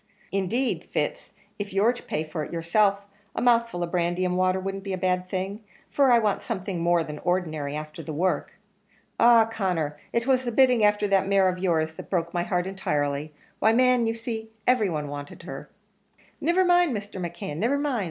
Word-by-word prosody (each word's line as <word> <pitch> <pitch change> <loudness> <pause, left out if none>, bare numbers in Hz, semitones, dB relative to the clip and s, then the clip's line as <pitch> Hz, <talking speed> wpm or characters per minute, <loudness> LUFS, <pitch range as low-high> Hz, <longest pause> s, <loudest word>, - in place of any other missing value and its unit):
"Indeed, 210 +7 -1
Fitz, - - -2 0.3
if 205 -1 -5
you're 210 +5 +3
to 245 - -10
pay 155 - -3
for 155 0 -4
it - - -8
yourself, 200 +4 +1 0.3
a - - -1
mouthful 230 -7 +2
of 170 - -4
brandy 175 +1 0
and 180 0 0
water 185 0 +2
wouldn't 195 +1 -4
be 195 -1 -4
a - - -2
bad 180 0 0
thing 195 +3 -4 0.3
for 275 -3 +4
I 240 - +7
want 215 -3 +1
something 190 -4 -4
more 170 0 +3
than 150 -1 -7
ordinary 155 -5 -1
afther 155 +1 -6
that 155 - -7
work. 180 +5 -1 0.6
Ah! 235 -1 +7
Conner, 180 -9 -2
it 235 0 0
was 260 -1 +2
the 240 - -2
bidding 250 -2 +4
afther 210 0 +3
that 195 -1 +3
mare 195 -1 +4
of 185 0 -1
your's 160 -4 +1
that - - -10
broke 170 -3 -1
my 175 - 0
heart 175 0 -1
entirely 150 -6 -2 0.3
why, 220 - +4
man, 250 -1 +4
you 225 - -1
see, 225 -1 -5 0.2
every 245 -5 +3
one 150 -3 -3
wanted 145 0 -8
her." - - -8 0.7
"Niver 355 +3 +3
mind, 350 -8 +3
Mr. 200 -2 -7
McKeon, 175 -2 -5
niver 235 - +1
mind!" 285 -4 -1
190 Hz, 200 wpm, -26 LUFS, 170-225 Hz, 0.7 s, I